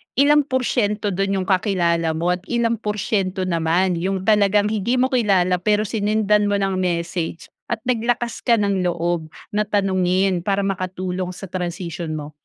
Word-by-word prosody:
ilang 290 +1 +4
porsiyento 220 -6 0
dun 195 +1 0
'yong 190 - -1
kakilala 170 -4 +1
mo 170 +3 0
at 180 - -1
ilang 235 -2 0
porsiyento 200 -3 -1
naman 170 +1 +1
'yong 190 +1 -2
talagang 205 0 +3
hindi 220 +3 0
mo 260 +2 +1
kilala 190 -7 +2
pero 210 +3 +2
sinendan 210 0 +1
mo 205 - +1
ng 195 -1 0
message 170 -2 -3 0.2
at 225 -2 -3
naglakas 240 -1 -1
ka 235 - +3
ng 200 -3 0
loob 170 -1 -1 0.2
na 210 0 0
tanungin 190 -2 +1
para 200 +1 0
makatulong 185 -1 -3
sa 195 - -8
transisyon 175 -2 -4
mo? 150 0 -6
195 Hz, 155 wpm, -21 LUFS, 180-210 Hz, 0.2 s, ilang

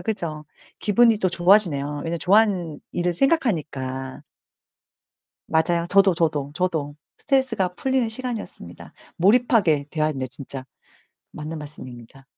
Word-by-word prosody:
그죠. 165 -9 -4 0.3
기분이 225 +1 +4
또 185 - +1
좋아지네요, 175 -5 +3 0.2
왜냐하면 170 0 -3
좋아하는 185 -5 +2
일을 175 0 0
생각하니까. 150 - -1 1.3
맞아요. 170 +1 +1
저도, 195 -1 +4
저도, 150 -4 -1
저도. 160 -5 -2 0.2
스트레스가 260 -9 +1
풀리는 260 +1 0
시간이었습니다. 220 - -7 0.2
몰입하게 195 - +3
대화했네 155 -4 -1
진짜. 135 +1 -8 0.7
맞는 155 +1 -6
말씀입니다. 135 -3 -11
170 Hz, 325 characters per minute, -23 LUFS, 145-210 Hz, 1.3 s, 기분이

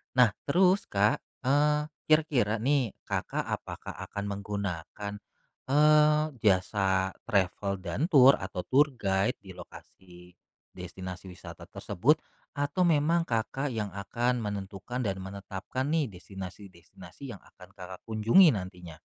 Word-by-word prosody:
Nah, 125 -5 +6 0.2
terus 185 +6 +3
Kak, 105 +1 +2 0.3
eee, 150 +2 +3 0.2
kira-kira 150 -9 +3
nih, 135 -5 +1
Kakak - - -2
apakah - - -5 0.2
akan 100 - -5
menggunakan, 100 -1 -5 0.6
eee, 150 +1 +5 0.2
jasa 95 -2 +2 0.2
travel 100 0 0
dan 100 - -1
tour 135 -4 +7
atau 95 -1 -4
tour 145 +1 +3
guide 100 +1 0
di 95 - -10
lokasi 90 0 -14 0.4
destinasi 90 +1 -8
wisata 90 - -11
tersebut 150 - +1 0.3
atau 145 +5 0
memang 165 +1 +2
Kakak 125 +4 -1
yang 105 -3 -2
akan 120 +5 -1
menentukan 100 +3 -5
dan 100 -5 -1
menetapkan 100 +7 -5
nih, 155 -6 +1
destinasi-destinasi 95 +4 -10
yang 100 - -12
akan - - -17
Kakak 95 0 -10
kunjungi 115 - +5
nantinya? 90 -5 -7
105 Hz, 120 wpm, -29 LUFS, 95-140 Hz, 0.6 s, tour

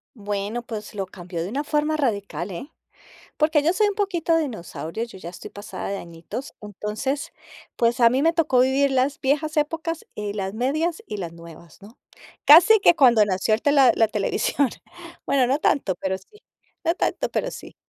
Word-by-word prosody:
Bueno, 205 +2 -4
pues, 215 -2 -7
lo 195 -2 -2
cambió 175 -2 -7
de 180 - -5
una 280 +5 -2
forma 300 +1 0
radical, 200 - -2
¿eh? 265 - -8 0.7
Porque 305 -1 +3
yo 325 - +3
soy 420 +3 +2
un 410 - -2
poquito 350 -5 +1
dinosaurio, 225 - -4
yo 235 -5 -12
ya 170 -2 -8
estoy 175 - -10
pasada 205 +1 -7
de 200 - -3
añitos, 170 - -8
entonces, 210 +7 -4 0.5
pues, 235 +2 +2
a 235 - +7
mí 255 +3 +1
me 330 +2 +3
tocó 300 -7 +2
vivir 270 +2 +3
las 265 +2 +1
viejas 300 +3 0
épocas 325 +2 -2
y 210 -1 -4
las 195 -1 -3
medias 310 - -1
y 210 - -5
las 175 -4 -5
nuevas, 170 0 -14
¿no? 210 +4 -15 0.5
Casi 355 +9 +8
que 345 - +6
cuando 240 -8 +6
nació 190 +2 0
el 220 - +1
tela 280 -4 +5
la 225 - +4
televisión, 235 +5 0 0.6
bueno, 265 -3 +2
no 270 +4 +1
tanto 210 - +1
pero 190 0 -2
sí. 420 - -21 0.4
No 335 0 +2
tanto - - -1
pero - - -1
sí. - - -10
245 Hz, 185 wpm, -23 LUFS, 200-300 Hz, 0.7 s, Casi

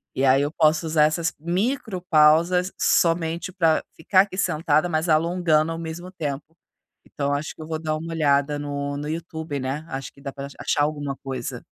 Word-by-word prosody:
E 135 - +1
aí, 135 +1 +5
eu 145 +1 -1
posso 155 0 +2
usar 155 -1 +3
essas 165 +2 0
micropausas 180 - +2
somente 165 0 +1
pra 165 -4 +2
ficar 185 +4 +4
aqui 195 -1 -4
sentada, 155 -2 +1
mas 160 +1 0
alongando 165 -1 +2
ao 165 - -4
mesmo 165 +2 -7
tempo. 150 -6 -4 0.6
Então 140 0 -2
acho 145 +2 -3
que - - -12
eu 155 - -8
vou 160 -1 -3
dar 155 -1 -2
uma 165 +1 -6
olhada 145 -2 +2
no 145 -1 -3
no 145 +1 -5
YouTube, 160 -2 -4
né? 135 +4 -3
Acho 135 0 -5
que 140 - -19
dá 140 - -5
pra 140 -1 -6
ach 140 - -13
achar 145 - +1
alguma 145 -2 -2
coisa. 130 -3 -6
155 Hz, 190 wpm, -24 LUFS, 145-170 Hz, 0.6 s, aí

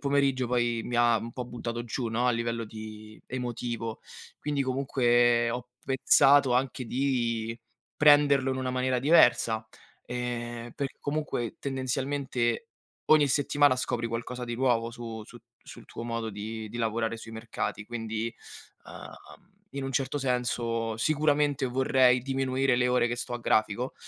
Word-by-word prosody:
pomeriggio 140 -2 +1
poi 120 -2 +1
mi 120 - -3
ha 120 -1 +4
un 115 +1 -7
po' 125 - -5
buttato 120 -1 -5
giù, 120 +1 -3
no, 120 +3 0
a - - +4
livello 115 0 -2
di 110 0 -10
emotivo. 120 -2 -4 0.4
Quindi 145 -2 -1
comunque 120 -3 +2
ho 125 +1 -5 0.2
pensato 135 0 +5
anche 130 0 0
di 120 -4 -1 0.4
prenderlo 145 -2 +5
in 130 - -1
una 130 -1 -2
maniera 130 0 0
diversa, 120 -6 +4 0.4
ehm, 120 -1 -4
perché 140 -1 -5
comunque 145 -6 -3
tendenzialmente 135 - -1 0.4
ogni 150 -2 +5
settimana 145 -1 +3
scopri 120 -2 -2
qualcosa 120 +2 -4
di 120 -1 -4
nuovo 120 -2 +1
su 115 -2 -7
su 120 +2 -13 0.3
sul 120 - -12
tuo - - -8
modo 115 -1 -3
di 110 +2 -6
di 120 - -8
lavorare 115 0 -1
sui 115 0 -10
mercati. 110 -2 -4
Quindi, 115 -1 -4 0.5
ehm, - - -12 0.2
in 140 -1 -3
un 135 - -4
certo 135 +3 -1
senso 120 -3 -1
sicuramente 145 0 +2
vorrei 125 0 +3
diminuire 135 0 0
le 125 0 +2
ore 125 -1 +2
che 120 - -2
sto 120 - -5
a 120 - -2
grafico, 110 +3 +1
120 Hz, 145 wpm, -28 LUFS, 115-135 Hz, 0.5 s, pensato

